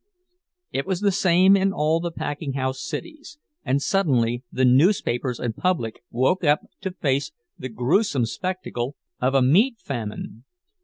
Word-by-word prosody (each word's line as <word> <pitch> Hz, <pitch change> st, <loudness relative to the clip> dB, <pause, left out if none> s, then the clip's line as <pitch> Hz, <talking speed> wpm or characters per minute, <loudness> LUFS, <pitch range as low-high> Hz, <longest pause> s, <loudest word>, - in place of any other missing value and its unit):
It 135 Hz, -, -2 dB
was 190 Hz, -1 st, -1 dB
the 205 Hz, -1 st, +3 dB
same 185 Hz, 0 st, +4 dB
in 195 Hz, 0 st, +2 dB
all 155 Hz, -1 st, +1 dB
the 170 Hz, +1 st, -2 dB
packing 145 Hz, -3 st, -4 dB
house 130 Hz, 0 st, -2 dB
cities; 310 Hz, -2 st, -7 dB, 0.3 s
and 135 Hz, 0 st, +1 dB
suddenly 125 Hz, -9 st, +1 dB
the 130 Hz, -, +1 dB
newspapers 125 Hz, -, +2 dB
and 115 Hz, -3 st, -3 dB
public 160 Hz, -12 st, -1 dB
woke 130 Hz, +10 st, +1 dB
up 150 Hz, -1 st, +3 dB, 0.2 s
to 190 Hz, -, -2 dB
face 140 Hz, -4 st, -1 dB, 0.2 s
the 130 Hz, -, -7 dB
gruesome 130 Hz, -, +1 dB
spectacle 140 Hz, -4 st, -4 dB, 0.3 s
of 130 Hz, +2 st, +1 dB
a 135 Hz, -, +5 dB
meat 210 Hz, -, +4 dB
famine. 115 Hz, -, -6 dB
140 Hz, 150 wpm, -23 LUFS, 125-185 Hz, 0.3 s, a